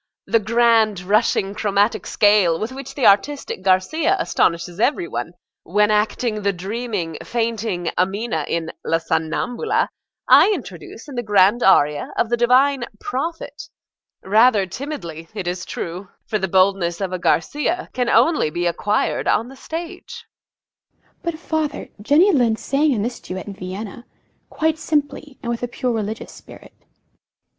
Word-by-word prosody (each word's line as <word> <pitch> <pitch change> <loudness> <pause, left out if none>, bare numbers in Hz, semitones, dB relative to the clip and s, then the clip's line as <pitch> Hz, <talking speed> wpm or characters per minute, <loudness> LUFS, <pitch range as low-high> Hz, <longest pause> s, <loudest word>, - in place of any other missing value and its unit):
The 230 - +2
grand, 225 -2 +3
rushing, 200 0 +1
chromatic 205 +1 0
scale 205 -6 +3
with 220 +3 -3
which 270 0 -8
the 270 - 0
artistic 205 +3 +2
Garcia 190 - +2
astonishes 170 - 0
every 295 - +1
one, - - -5 0.3
when 210 0 +2
acting 215 +1 0
the 200 0 +1
dreaming, 195 -2 -4
fainting 225 -6 -2
Amina 190 -3 -1
in 165 -1 -2
"La 165 - +1
Somnambula," 165 - -1 0.4
I - - +7
introduce 210 - -10
in 285 - -9
the 245 - -2
grand 205 +1 +3
aria 150 -7 +3
of 230 - +1
the - - +4
divine 255 +2 +3
"Prophet;" 315 +3 -5 0.5
rather 215 +1 +4
timidly, 175 - -7
it 195 -4 -4
is 180 +1 -3
true, 180 +3 -6 0.2
for 215 - -1
the 190 - -1
boldness 185 -2 +2
of 190 -2 -3
a 185 - -2
Garcia 295 - 0
can 245 -1 0
only 320 - +3
be 175 +3 -3
acquired 205 +5 0
on 230 +3 +1
the 270 - -12
stage. 335 +6 -7 0.7
EMMA. - - -38
But, 340 -2 -3
father, 315 -3 -3
Jenny 305 - +4
Lind 240 -8 +2
sang 285 +5 +1
in 215 -6 0
this 240 +1 -4
duet 185 0 -7
in 205 - -7
Vienna, 195 +5 -7 0.4
quite 320 0 0
simply, 295 -2 -2
and 235 - -2
with 235 - -3
a 245 - -2
pure 250 +1 -2
religious 220 -1 -4
spirit. - - -14
220 Hz, 150 wpm, -21 LUFS, 185-265 Hz, 0.7 s, I